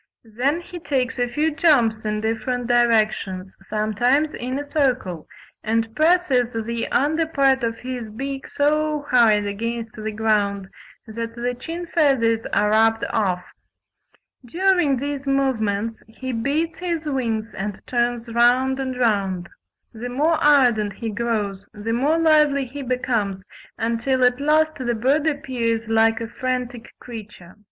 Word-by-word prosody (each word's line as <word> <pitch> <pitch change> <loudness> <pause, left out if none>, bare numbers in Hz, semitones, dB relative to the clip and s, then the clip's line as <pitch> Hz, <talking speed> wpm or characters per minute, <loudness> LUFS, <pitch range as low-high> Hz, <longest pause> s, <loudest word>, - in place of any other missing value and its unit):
Then 280 +8 +1
he 350 0 -9
takes 260 -5 -1
a 245 - +2
few 300 +6 0
jumps 240 -9 +2
in 210 0 -1
different 230 +3 -2
directions, 215 -6 +1
sometimes 225 +9 +1
in 255 +2 -4
a 290 - -4
circle, 255 - -1 0.4
and 225 0 -1
presses 310 -7 +3
the 230 +1 -3
under 315 +4 +1
part 270 -4 +2
of 230 -1 0
his 245 -3 -6
beak 270 +5 -5
so 300 0 0
hard 220 -4 +4
against 230 +2 -4
the 215 0 -5
ground 205 -3 0 0.4
that 230 +1 -6
the 245 +1 -2
chin 330 +8 -6
feathers 265 -9 +2
are 210 0 +2
rubbed 225 +1 +3
off. 185 -5 0 1.0
During 345 0 +2
these 280 +1 -4
movements 230 -6 0
he 260 +3 -6
beats 285 +8 -1
his 340 -3 -3
wings 230 -6 -2
and 200 0 -4
turns 240 -1 -1
round 245 +3 +3
and 260 -1 -3
round. 195 -7 0 0.4
The 240 +2 -6
more 310 +6 +1
ardent 245 -8 +4
he 225 +2 -5
grows 210 -3 -2
the 215 +2 -3
more 285 +7 +2
lively 300 -4 +4
he 275 +3 -8
becomes, 235 -7 -1 0.3
until 235 +3 0
at 250 +2 +3
last 310 +2 +2
the 240 -3 -1
bird 280 +7 +2
appears 240 -6 -2
like 225 0 +3
a 230 - -4
frantic 250 0 -4
creature." 210 -7 -10
240 Hz, 140 wpm, -22 LUFS, 220-280 Hz, 1.0 s, hard